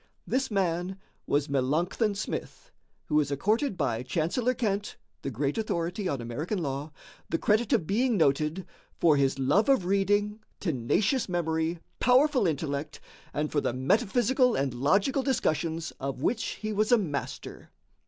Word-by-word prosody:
This 265 +1 0
man 185 -2 -1 0.3
was 145 +1 +1
Melancthon 160 - 0
Smith, - - -5 0.3
who 150 - +2
is 145 -2 0
accorded 210 - 0
by 120 -7 0
Chancellor 170 - 0
Kent, 205 -3 -1 0.3
the - - -3
great 135 - -1
authority 180 -1 -2
on 140 - -2
American 120 - -3
law, 140 +2 -3 0.4
the 165 - +1
credit 215 +5 +1
of 160 - +3
being 230 +5 +1
noted 155 +3 +1 0.3
"for 160 -3 +5
his 140 -1 +2
love 145 - +2
of 265 -10 +4
reading, 205 +2 +1 0.2
tenacious 190 - 0
memory, 165 -1 0 0.2
powerful 255 - +4
intellect, 150 -1 -3 0.3
and 150 +1 -2
for 145 - +1
the - - -1
metaphysical 240 - +2
and 135 -2 0
logical 195 - +2
discussions 165 - -1
of 135 0 -4
which 230 -1 +1
he 215 0 -4
was 215 +3 +1
a 240 - +7
master." 150 -10 -5
175 Hz, 145 wpm, -28 LUFS, 145-215 Hz, 0.4 s, a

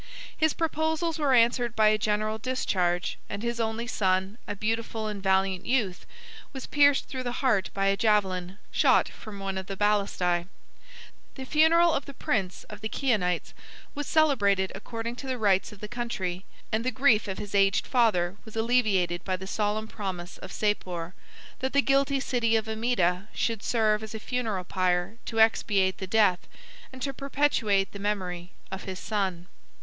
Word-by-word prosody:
His 315 -1 +2
proposals 320 0 -1
were 280 -4 +3
answered 235 0 +3
by 215 -1 +5
a 215 - +3
general 215 +1 0
discharge, 185 -7 -1
and 200 +2 -5
his 235 0 -2
only 225 +1 -1
son, 190 -2 0
a 205 - -3
beautiful 225 +1 -2
and 210 -2 -5
valiant 190 -1 +1
youth, 215 -8 0 0.5
was 265 - -6
pierced 285 -1 +4
through 260 - -5
the 245 -1 -3
heart 205 -7 +2
by 195 0 0
a 195 0 +3
javelin, 195 -4 +1
shot - - +4
from 210 -3 -10
one 195 -1 -3
of 190 - -8
the 195 - -5
balistæ. 195 -4 +1 0.9
The 265 - -7
funeral 320 +4 +4
of 275 - -1
the 280 - -10
prince 190 -8 -2
of 210 -1 -11
the 220 - -3
Chionites 210 -11 0 0.4
was 290 0 -4
celebrated 205 -12 +3
according 230 +4 -5
to 270 - -7
the 260 -1 -1
rites 200 -2 +2
of 210 - -14
the 210 - -5
country; 190 -6 -4 0.3
and 220 +1 0
the 255 - +1
grief 255 -5 +3
of 190 - -4
his 205 -1 -7
aged 195 -1 +3
father 205 -7 +2
was 220 - -13
alleviated 215 -7 +1
by 185 - -1
the 190 - -8
solemn 210 +2 -1
promise 185 -5 -6
of - - -9
Sapor, 180 -5 -2 0.5
that 265 0 -2
the 280 - +5
guilty 275 0 +2
city 240 -4 +1
of 220 0 0
Amida 220 -5 0
should 225 -3 -1
serve 215 -2 +1
as 220 0 -7
a - - -4
funeral 220 -5 -2
pile 180 +3 0
to 225 - -3
expiate 200 -4 +3
the 190 - -5
death, 205 -3 +3 0.4
and 260 -1 -8
to 275 - -2
perpetuate 265 -8 +1
the 200 - -9
memory, 185 -4 -3 0.2
of 190 - -6
his 190 -1 -5
son. 190 -4 -2
215 Hz, 175 wpm, -27 LUFS, 190-245 Hz, 0.9 s, by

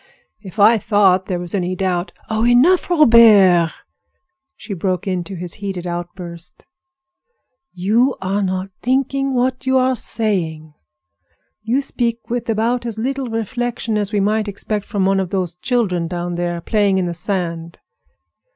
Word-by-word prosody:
If 195 -1 -11
I 215 +2 +5
thought 190 -2 +2
there 185 - -1
was 175 -1 -5
any 185 -2 -1
doubt—" 185 -1 -1 0.2
"Oh, 220 0 -1
enough, 255 +12 +4
Robert!" 220 - +6 0.8
she 215 - -8
broke 185 +1 -2
into 185 -1 -3
his 175 -1 -6
heated 190 -3 -4
outburst. 175 -1 -7 1.1
"You 220 +9 +1
are 195 +2 -1
not 190 0 -2
thinking 270 +2 0
of 270 - -2
what 255 +1 -1
you 260 0 +3
are 260 0 +2
saying. 165 -11 -2 0.9
You 240 +6 0
speak 235 -3 -3
with 240 -1 -3
about 230 +3 0
as 225 -2 -4
little 265 +3 -2
reflection 225 0 -3
as 205 -1 -1
we 210 - +1
might 215 +2 0
expect 205 +1 -4
from 200 -4 -1
one 195 0 +2
of 190 -2 -2
those 180 -3 -1
children 180 -4 -1
down 175 0 -4
there 175 0 -3
playing 205 0 +1
in 185 - 0
the 175 - -3
sand. 170 -1 -4
200 Hz, 150 wpm, -19 LUFS, 180-235 Hz, 1.1 s, Robert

